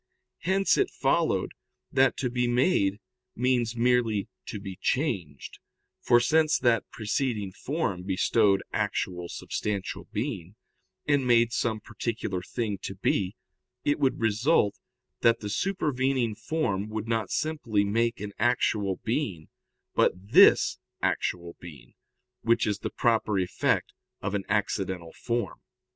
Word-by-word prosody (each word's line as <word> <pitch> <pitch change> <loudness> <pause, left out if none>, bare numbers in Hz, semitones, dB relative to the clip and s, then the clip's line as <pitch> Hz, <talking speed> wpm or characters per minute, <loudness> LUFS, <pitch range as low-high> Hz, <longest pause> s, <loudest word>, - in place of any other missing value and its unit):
Hence, 190 +3 +2
it 400 - +2
followed - - +1 0.4
that 135 0 +3
to 125 -2 -1
be 125 0 +1
made 120 - +2 0.4
means 120 -1 +1
merely 120 -4 +2 0.2
to 105 - -5
be 95 -2 -7
changed; 95 - -2 0.4
for 120 - +5
since 155 +5 +3
that 115 -4 +2
preceding 110 -2 -2
form 125 - -2
bestowed 95 +2 +2
actual 90 -4 -2
substantial 100 -3 -4
being, 105 - -4 0.5
and 145 -3 +2
made 120 -1 +4
some 110 -3 0
particular 110 -3 -3
thing 105 0 -3
to 95 - -6
be, 95 +1 0 0.5
it 145 - +2
would 135 - +1
result 110 +1 +2 0.4
that 115 0 +4
the 105 - -5
supervening 135 - 0
form 110 -4 -2
would 110 0 -4
not 115 -3 -1
simply 135 -10 0
make 115 +3 0
an 100 0 -6
actual 105 -5 +1
being, 110 - -2 0.4
but - - +3 0.2
'this' - - +6 0.2
actual 85 -1 -1
being; 70 -9 -12 0.5
which 115 0 +2
is 105 -1 -1
the - - -3
proper 110 -3 +1
effect 90 -1 0 0.3
of 100 - -3
an 100 -1 -2
accidental 95 -4 -1
form. 120 -6 -3
110 Hz, 125 wpm, -27 LUFS, 100-125 Hz, 0.5 s, this